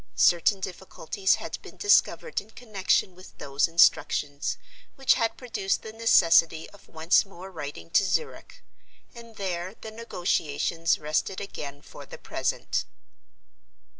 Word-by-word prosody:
Certain 175 +3 +4
difficulties 190 0 -1
had - - -7
been - - -13
discovered 430 +3 +2
in 205 - -19
connection 210 -5 0
with 185 +1 -15
those 140 +2 0
instructions, 145 -3 +2 0.4
which 270 -1 +4
had 225 -1 -1
produced 215 -6 -2
the 220 - -8
necessity 165 -7 +4
of 205 - -18
once 160 +2 +3
more 190 -1 -12
writing 155 -1 -8
to 200 - +4
Zurich. 470 - -3 0.5
And 230 -1 -13
there 185 0 -4
"the 220 - -8
negotiations" 165 -7 -1
rested 155 +5 -2
again 145 -7 -7
for - - -12
the - - -10
present. - - -2
185 Hz, 130 wpm, -26 LUFS, 165-220 Hz, 0.5 s, Certain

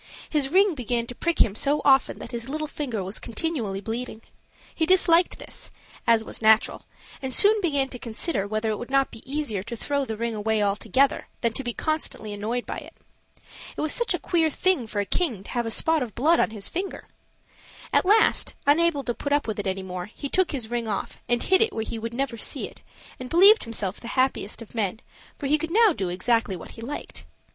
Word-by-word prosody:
His 290 -3 +2
ring 385 +4 +4
began 240 -4 -1
to 245 - -6
prick 340 +6 -1
him 200 - -4
so 285 +7 +1
often 270 -1 +4
that - - -8
his 235 +1 -5
little 310 +2 -2
finger 265 -9 -4
was 190 +3 -4
continually 230 -7 -3
bleeding. 225 +1 -5 0.5
He 320 - 0
disliked 355 -1 +4
this, - - -7 0.4
as 230 -1 +4
was - - -7
natural, 220 0 +3 0.3
and 265 -1 -3
soon 420 - +5
began 285 -7 +1
to 250 - -5
consider 230 - -2
whether 215 +1 -1
it 210 - -3
would 240 - -7
not 275 0 +2
be - - -11
easier 280 -10 -1
to 230 +4 -6
throw 280 +4 -1
the 225 -4 -4
ring 230 +1 -2
away 215 0 0
altogether 220 +7 +1
than 235 -2 +1
to 270 - -3
be 240 -2 -3
constantly 310 -9 -2
annoyed 225 +4 -3
by - - -5
it. - - -13 0.8
It - - -2
was 305 - 0
such 475 -6 +2
a - - -5
queer 330 -2 +1
thing 310 -6 +1
for 205 -1 -1
a - - -3
king 235 - 0
to - - -10
have 240 -1 -1
a - - -1
spot 320 +7 +1
of 230 -5 -4
blood 315 +7 +3
on - - +3
his 215 -2 -4
finger! 375 +3 -4 0.9
At - - +4
last, 425 +4 +3
unable 295 0 +3
to 240 - -2
put 285 - -5
up 290 -3 +1
with 215 -1 -3
it 200 - -3
any 190 0 -2
more, 180 -1 -5
he 280 +6 -7
took 375 +3 +2
his 245 -6 -4
ring 235 -1 -2
off 205 -3 -4
and 240 0 +2
hid 380 +1 +4
it 450 -2 +3
where 220 - -2
he 225 - -5
would 230 +1 -5
never 265 -2 -2
see - - -1
it; - - -13 0.4
and 255 0 -7
believed 395 - +7
himself 210 -4 -2
the 235 - -9
happiest 255 -4 0
of 225 - -18
men, 220 -2 -1 0.4
for 285 - -6
he 300 +2 +2
could 325 - -3
now 430 +1 +5
do 190 -10 -3
exactly 205 +2 +1
what 170 - -10
he 230 - -11
liked. 280 +6 -7
245 Hz, 225 wpm, -25 LUFS, 220-305 Hz, 0.9 s, believed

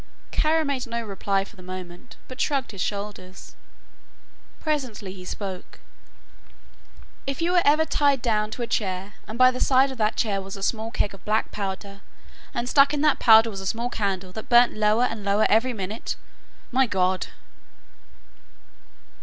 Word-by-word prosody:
Kara 315 +1 +2
made 270 -3 -2
no 235 0 -3
reply 195 -1 -1
for 215 - -16
the 185 - -13
moment, 185 +4 -9
but 255 - -6
shrugged 275 -3 0
his 195 -3 -6
shoulders. 200 -2 -5 1.0
Presently 255 -11 -3
he 185 -1 -10
spoke. 185 0 -7 1.5
"If 275 -1 -3
you 340 +1 +1
were 360 -1 +4
ever 305 +2 +4
tied 285 -3 +2
down 215 -3 0
to 240 - -5
a - - 0
chair 195 -3 -2
and 220 - -6
by 255 0 +7
the 255 - -6
side 265 +1 +4
of 260 - -9
that 215 0 +1
chair 200 -3 0
was 195 +1 -8
a 195 - -7
small 220 +1 -1
keg 205 - -1
of 195 - -14
black 215 +1 0
powder 200 0 -5 0.5
and 240 0 -3
stuck 280 +3 +5
in 285 - -1
that 305 0 +3
powder 225 0 +7
was 195 -2 -6
a 195 - -5
small 235 +4 -2
candle 190 -3 -2
that 220 +3 -8
burnt 240 0 +6
lower 215 +2 +2
and 225 -4 -2
lower 200 +2 +2
every 225 +4 +3
minute 210 0 -4 0.6
my 260 0 +3
God!" 185 -2 0
220 Hz, 170 wpm, -25 LUFS, 195-255 Hz, 1.5 s, by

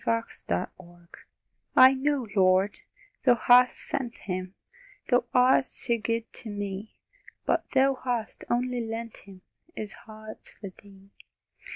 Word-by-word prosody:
MARY 230 - +2
AT 230 - -8
NAZARETH 175 -1 -5 0.7
I 260 +1 +9
know, 270 -1 0
Lord, 190 +1 +3 0.4
Thou 250 -2 +5
hast 250 +1 +5
sent 245 -3 -4
Him 185 -1 -5 0.5
Thou 245 0 +3
art 255 +1 +4
so 235 -2 -1
good 230 +1 -1
to 230 - -7
me! 205 0 -5 0.5
But - - 0
Thou 270 +1 +5
hast 240 -3 -3
only 245 0 0
lent 225 0 -6
Him, 190 -2 -15 0.3
His 215 -1 -5
heart's 215 0 -12
for 200 - -9
Thee! 195 0 -18
225 Hz, 135 wpm, -27 LUFS, 195-250 Hz, 0.7 s, I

